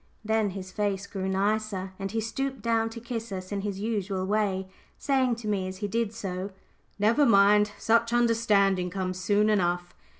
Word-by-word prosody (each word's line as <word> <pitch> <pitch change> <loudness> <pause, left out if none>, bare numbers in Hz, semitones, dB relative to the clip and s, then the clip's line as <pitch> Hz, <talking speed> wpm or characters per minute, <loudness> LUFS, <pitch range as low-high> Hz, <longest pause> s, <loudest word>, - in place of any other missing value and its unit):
Then 220 -1 +1
his 185 -1 -7
face 200 -1 -1
grew 190 -1 -4
nicer 210 +2 0
again, 190 0 -7
and 195 0 -3
he 225 +2 -1
stooped 265 +2 -3
down 225 -1 +1
to 230 +1 -8
kiss 230 -1 -5
us 185 0 -6
in 200 -1 -2
his 200 -1 -4
usual 200 -3 -2
way, 195 -2 0 0.3
saying 260 -3 +1
to 230 -1 -8
me 195 -3 0
as 185 0 -6
he 205 - -3
did 225 +1 -1
so, 195 -3 -4 0.5
"Never 220 +8 +3
mind; 210 -2 +5
such 230 +1 +2
understanding 215 -6 +3
comes 185 0 -3
soon 205 +3 +2
enough." 175 -4 +1
205 Hz, 180 wpm, -27 LUFS, 190-225 Hz, 0.5 s, mind